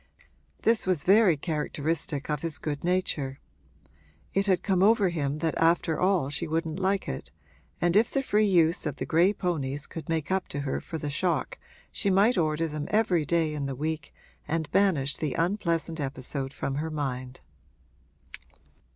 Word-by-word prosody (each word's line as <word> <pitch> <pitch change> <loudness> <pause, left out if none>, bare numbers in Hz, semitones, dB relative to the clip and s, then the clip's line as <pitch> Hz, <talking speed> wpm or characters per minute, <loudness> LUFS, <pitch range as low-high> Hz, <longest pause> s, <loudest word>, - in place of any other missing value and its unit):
This 225 -3 +3
was 180 -6 +1
very 195 -4 +5
characteristic 150 -1 -2
of 150 -1 -2
his 165 -2 -3
good 145 -2 -4
nature; 160 -7 -1 0.9
it 195 +1 +1
had 185 -2 +2
come 190 -3 +1
over 205 -1 +5
him 145 -4 -1
that 160 - +1
after 165 -1 +2
all 180 -7 +2
she 150 - -1
wouldn't 160 +1 -2
like 195 +1 0
it, 65 - -5 0.5
and 175 +1 +1
if 220 +3 +5
the 275 - -1
free 215 -3 +2
use 170 -3 +3
of 145 - -3
the - - -4
gray 170 +4 +4
ponies 150 -8 -2
could 165 +1 -8
make 160 0 -1
up 190 0 0
to 140 - -4
her 140 -2 -2
for 165 - -6
the 145 -2 -4
shock 160 -1 -1 0.3
she 200 - 0
might 200 +6 +4
order 160 -2 +1
them 150 -1 -5
every 200 -7 +2
day 160 0 +1
in 145 -2 -3
the 135 - -4
week 155 +1 -3 0.4
and 160 -1 -2
banish 155 -9 +2
the 150 -5 -2
unpleasant 165 -2 -1
episode 135 0 -4
from 140 -1 -3
her 160 - -3
mind. 130 -4 -4
160 Hz, 170 wpm, -27 LUFS, 145-185 Hz, 0.9 s, very